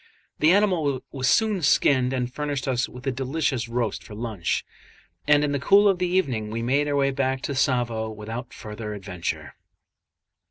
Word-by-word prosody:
The 155 - +5
animal 170 -10 +2
was 130 -1 -2
soon 215 -1 +3
skinned 130 -3 +3
and 125 -1 -2
furnished 145 -2 -3
us 125 -2 0
with 125 +2 -11
a 135 - +1
delicious 130 -2 -1
roast 115 -3 -2
for 105 - -10
lunch; 110 -6 -2 0.6
and 150 0 +5
in 145 - 0
the 140 - 0
cool 200 +8 +5
of 195 -3 +2
the 180 - +1
evening 135 -13 0
we 115 +2 -3
made 140 +5 +1
our 145 - 0
way 135 -1 +2
back 130 -1 -1
to 140 - -2
Tsavo 120 -4 0
without 110 +3 -7
further 105 0 -7
adventure. 90 -4 -5
130 Hz, 175 wpm, -25 LUFS, 115-145 Hz, 0.6 s, The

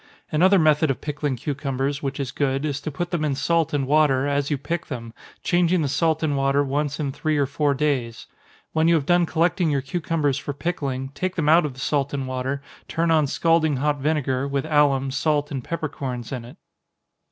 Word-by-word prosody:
Another 185 +6 +5
method 155 -2 +4
of 135 - -1
pickling 145 -2 -2
cucumbers, 140 +1 -2
which 140 0 -3
is 135 -2 -3
good, 135 0 -1
is 145 -2 -2
to 155 - -4
put 175 +4 -4
them 170 -4 -1
in 145 -3 0
salt 165 +2 +1
and 145 -2 0
water, 140 -2 +3
as 145 0 0
you 145 - 0
pick 170 +5 -4
them 115 -4 -6 0.3
changing 175 -1 +2
the - - 0
salt 160 +3 +1
and 150 -2 +1
water 135 +1 +2
once 145 +2 -2
in 145 -3 -1
three 155 +2 -1
or 140 - +3
four 145 +1 0
days. 130 -5 -1 0.5
When 160 0 +3
you 170 - +5
have 150 -4 0
done 175 +1 +3
collecting 170 +1 +1
your 140 -2 +1
cucumbers 145 -1 -1
for 145 - -5
pickling, 135 -5 -3
take 185 +6 -3
them 160 -4 -1
out 160 +1 +5
of 135 - -9
the - - -12
salt 140 0 0
and 135 -2 -3
water, 130 +2 -3 0.2
turn 165 0 0
on 155 -3 +3
scalding 165 0 +2
hot 145 +1 0
vinegar, 140 -2 0
with 140 0 -1
alum, 145 -3 +2
salt 150 +1 0
and 135 -3 -4
peppercorns 130 -7 -4
in 125 -3 -5
it. 120 - -13
145 Hz, 210 wpm, -23 LUFS, 135-160 Hz, 0.5 s, Another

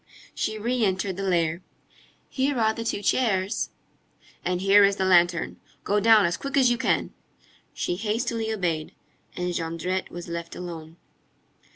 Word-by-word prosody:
She 215 - -2
re 240 +3 -1
entered 190 -1 0
the 195 - -5
lair. 170 -3 0 0.7
"Here 270 0 -1
are 220 -1 +2
the 230 - -5
two 215 -2 -2
chairs." 200 -5 +1 0.7
"And 180 0 -1
here 195 +2 +6
is 200 0 +4
the 190 - -1
lantern. 175 -2 +3 0.3
Go 205 +1 +1
down 220 -1 +6
as 170 0 0
quick 275 0 -3
as 255 -3 +5
you 240 - +1
can." - - 0 0.6
She 175 - -2
hastily 225 +1 -1
obeyed, 170 -7 -2 0.4
and 180 0 -2
Jondrette 170 +3 -2
was 175 0 -8
left 170 0 -6
alone. 165 -2 -8
190 Hz, 155 wpm, -25 LUFS, 175-220 Hz, 0.7 s, here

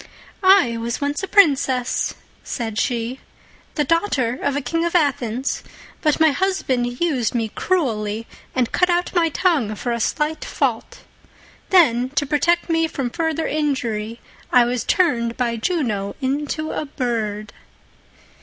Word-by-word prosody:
"I 375 - +5
was 230 +1 -3
once 285 +3 -1
a 385 - -3
princess," 270 -10 +3 0.3
said 225 -3 -3
she, 245 0 -1 0.6
"the 300 - +2
daughter 290 - 0
of 285 -1 0
a - - +1
King 330 +6 -1
of 340 +1 -1
Athens, 265 -5 0 0.4
but 305 -1 +2
my 320 -1 +5
husband 265 -8 -1
used 265 -10 0
me 225 -2 0
cruelly, 225 - -1 0.3
and 250 -3 +1
cut 360 - +2
out 350 0 0
my 340 -2 +3
tongue 290 - +1
for 240 +3 -3
a 235 - -1
slight 300 +7 -1
fault. - - -2 0.7
Then, 255 -9 +4
to 290 - +2
protect 340 +4 +1
me 325 -1 +2
from 270 -6 -3
further 320 0 -1
injury, 235 -7 -2 0.3
I 245 -1 +6
was 245 0 -1
turned 235 - +1
by 240 -2 0
Juno 225 - -1
into 295 +3 -2
a - - -3
bird." 220 -7 -3
270 Hz, 145 wpm, -21 LUFS, 235-325 Hz, 0.7 s, I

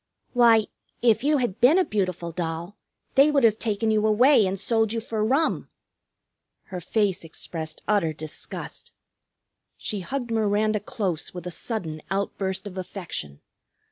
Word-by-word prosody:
"Why, 230 -3 +6 0.4
if 230 0 +4
you 295 +1 +3
had 240 -7 -2
been 270 +8 +6
a 375 - +4
beautiful 185 -5 -2
doll 170 +3 -4 0.4
they 275 +3 +6
would 285 -3 +2
have 220 -1 +4
taken 220 0 0
you 215 0 +2
away 225 0 +5
and 190 +1 -2
sold 225 +1 +1
you 230 - -1
for 220 -1 -2
rum." 275 +8 +1 0.9
Her 180 -1 -7
face 195 -1 0
expressed 160 -1 -7
utter 200 -7 +2
disgust. 155 0 -7 0.8
She 210 - -3
hugged 245 +5 -4
Miranda 215 -1 +2
close 195 -7 -3
with 180 -1 -7
a 180 - -4
sudden 165 -8 -3
outburst 195 0 -2
of 190 -2 -6
affection. 165 - -6
210 Hz, 145 wpm, -25 LUFS, 180-230 Hz, 0.9 s, Why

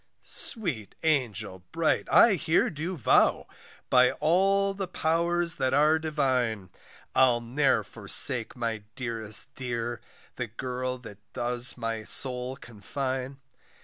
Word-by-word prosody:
Sweet 155 - -2
angel 110 -11 0
bright, 165 -1 0
I 230 - +7
here 160 -2 +1
do 165 +4 -4
vow, 125 - +3 0.4
By 125 0 +4
all 195 +5 +2
the 195 -1 -4
powers 170 0 0
that 130 -1 +1
are 155 +2 +4
divine, 130 - -1 0.4
I'll 125 -2 +4
ne'er 130 +5 +1
forsake 120 -2 +1
my 115 -3 -3
dearest 115 -1 -1
dear, 120 -2 -4 0.4
The 125 - -3
girl 125 +3 -4
that 105 -5 -12
does 120 +1 -2
my 115 -2 -3
soul 125 +1 0
confine. 130 +4 -5
130 Hz, 115 wpm, -27 LUFS, 120-160 Hz, 0.4 s, I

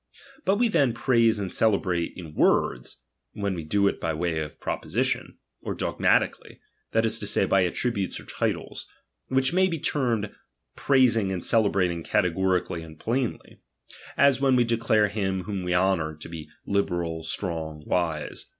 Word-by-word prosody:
But 195 - +3
we 240 +3 +3
then 140 - +2
praise 115 -3 +3
and 95 -3 -4
celebrate 90 -6 +1
in 80 -4 -9
words, - - +1 0.3
when 100 -1 -2
we 85 -3 -5
do 100 +6 +2
it - - -1
by 80 -1 -1
Way 85 0 -1
of 75 -2 -6
proposition, - - -2 0.2
or - - -4
dogmatically, - - 0 0.3
that 115 0 +2
is 110 0 0
to 105 - -4
say, 100 - +2
by 95 -1 +3
attributes 100 +2 -1
or - - -13
titles; - - -3 0.4
which 130 +3 +2
may 185 +1 +4
be 170 -3 -2
termed 120 -8 -1 0.4
prais 130 -4 +4
ing 100 -4 0
and 90 -2 -3
celebrating 95 -6 +2
categorically 90 0 0
onA 80 -1 -11
plainly; 120 +4 -3 0.6
as 140 -2 +4
when 135 -2 +4
we 125 - +4
declare 115 -2 +2
him 95 -2 -2
whom 100 0 -4
we 90 0 0
honour 90 -4 +1
to 75 - -10
be 80 -2 -8 0.2
libe 100 0 +1
fctZ, 85 -2 -3
strong, 80 -3 -4
wise. 80 -4 -2
100 Hz, 165 wpm, -26 LUFS, 85-115 Hz, 0.6 s, may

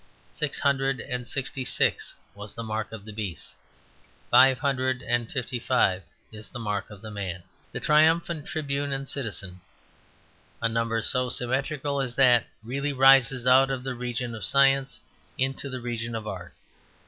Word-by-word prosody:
Six 150 -2 -3
hundred 135 -2 +1
and 125 +1 -5
sixty 135 0 -2
six 125 - +3 0.2
was 105 0 -8
the 115 - -5
Mark 110 0 -4
of 110 -2 -9
the 110 - -9
Beast. 100 -5 -6 0.8
Five 130 0 +7
hundred 130 -2 -1
and 120 -1 -1
fifty 130 -2 -3
five 115 -7 +2 0.3
is 110 0 -9
the - - -8
Mark 105 -4 -3
of 105 0 -13
the 110 - -7
Man; 95 -4 -5 0.3
the - - -4
triumphant 160 +1 +2
tribune 140 -2 -2
and 135 0 -4
citizen. 100 -10 -3 1.0
A 115 - +1
number 115 0 -1
so 125 -1 +2
symmetrical 140 +3 -1
as 125 -3 -4
that 125 -3 +5 0.2
really 140 +5 -3
rises 135 -2 +5
out 130 +1 +6
of 130 -2 -3
the 130 0 -3
region 120 0 -4
of 110 -2 -7
science 135 +3 +3 0.4
into 135 +1 -2
the 130 -1 -5
region 115 -1 -4
of 110 -1 -5
art. 90 -4 -7
125 Hz, 160 wpm, -26 LUFS, 110-135 Hz, 1.0 s, Five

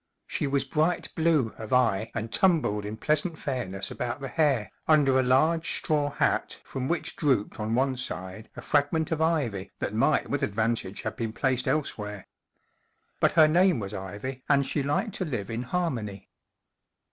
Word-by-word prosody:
She - - -2
w 140 0 +1
T 135 - -2
as - - -21
bright 155 +5 0
blue 160 -8 +2
of 110 -1 -7
eye 115 -4 +2
and 115 -1 -4
tumbled 150 - +2
in 105 +1 -5
pleasant 155 +6 0
fairness 95 -10 -3
about 125 +2 -3
the 135 -1 -5
hair, 140 -9 +1 0.2
under 140 -4 +5
a - - +5
large 155 +6 +3
straw 145 -2 0
hat 145 - 0
from 130 -1 -4
which 170 +3 -1
drooped 130 -10 0
on 110 +1 -1
one 130 +1 +1
side 95 -4 -5
a - - -7
fragment 150 +2 +1
of 160 -1 0
ivy 140 - 0
that - - -3
might 140 +7 +2
with 145 - -1
advantage 110 -2 -1
have 110 - -3
been 115 -2 -3
placed 130 0 0
elsewhere. 105 -8 -2 0.9
But - - +3
her 155 -1 +7
name 175 -1 +4
was 100 -1 -5
Ivy, 105 +7 -6
and 140 -1 +4
she 145 - -1
liked 145 - -1
to - - -1
live 120 - -4
in 115 +1 -2
harmony. 120 - -3
130 Hz, 180 wpm, -27 LUFS, 110-155 Hz, 0.9 s, her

